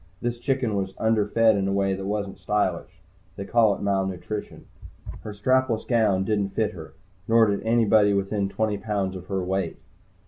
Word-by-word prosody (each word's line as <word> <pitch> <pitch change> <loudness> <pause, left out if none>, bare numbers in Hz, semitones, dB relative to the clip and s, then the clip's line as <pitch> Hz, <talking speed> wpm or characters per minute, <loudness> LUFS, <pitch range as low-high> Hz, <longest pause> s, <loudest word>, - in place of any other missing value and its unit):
This 120 0 -3
chicken 130 -3 -1
was 95 -1 -3
underfed 110 -1 0 0.2
in 100 -1 0
a - - 0
way 100 0 +1
that 95 0 -5
wasn't 100 -1 -3
stylish. 100 -4 -2 0.3
They 100 - -6
call 110 -2 +3
it - - -8
malnutrition. 95 0 -3 0.5
Her 105 - -8
strapless 120 +2 0
gown 110 -6 +2
didn't 100 -1 -1
fit 110 -2 +1
her, 80 -5 -11 0.3
nor 115 0 +5 0.2
anybody 110 -2 +4
within 100 0 -1
twenty 105 0 -1
pounds 100 -3 -2
of 90 0 -9
her 95 -2 -2
weight. 95 -2 -2
100 Hz, 165 wpm, -25 LUFS, 95-110 Hz, 0.5 s, nor